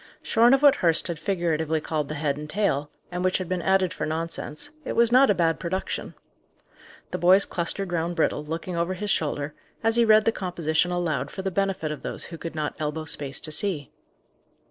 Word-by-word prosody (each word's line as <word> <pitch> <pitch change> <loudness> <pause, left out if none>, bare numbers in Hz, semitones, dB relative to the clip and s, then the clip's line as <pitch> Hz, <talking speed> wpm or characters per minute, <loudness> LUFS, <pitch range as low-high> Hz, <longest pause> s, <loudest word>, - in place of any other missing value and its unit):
Shorn 235 +3 +5
of 275 - -2
what 285 -1 +7
Hurst 165 0 +2
had 165 -3 -3
figuratively 160 -3 0
called 150 -2 -2
the 155 - -3
head 145 -1 0
and 150 +1 -8
tail, 150 -7 0 0.2
and 180 0 -3
which 185 0 +2
had 185 - -4
been 180 0 -1
added 190 -1 +2
for - - -3
nonsense, 160 -1 -4
it - - -4
was 235 0 +4
not 260 +2 +6
a 205 - +4
bad 165 -2 +1
production. 185 +2 -3 1.0
The - - -3
boys 185 +3 +6
clustered 180 +2 -2
round 170 0 -1
Brittle, 155 -2 +1
looking 165 +3 -4
over 170 +2 -1
his 205 +2 -2
shoulder, 145 -1 -1 0.3
as 225 +1 +2
he 235 - +6
read 215 -1 +5
the 225 - +4
composition 175 -4 0
aloud 160 -6 -1
for 190 - -6
the 190 - -1
benefit 195 -5 -1
of 150 - -6
those - - -3
who 165 -1 -8
could 165 -1 -6
not 150 -1 -2
elbow 155 +1 -3
space 140 -3 -4
to 155 - -4
see. 155 -4 -1
170 Hz, 210 wpm, -25 LUFS, 155-190 Hz, 1.0 s, what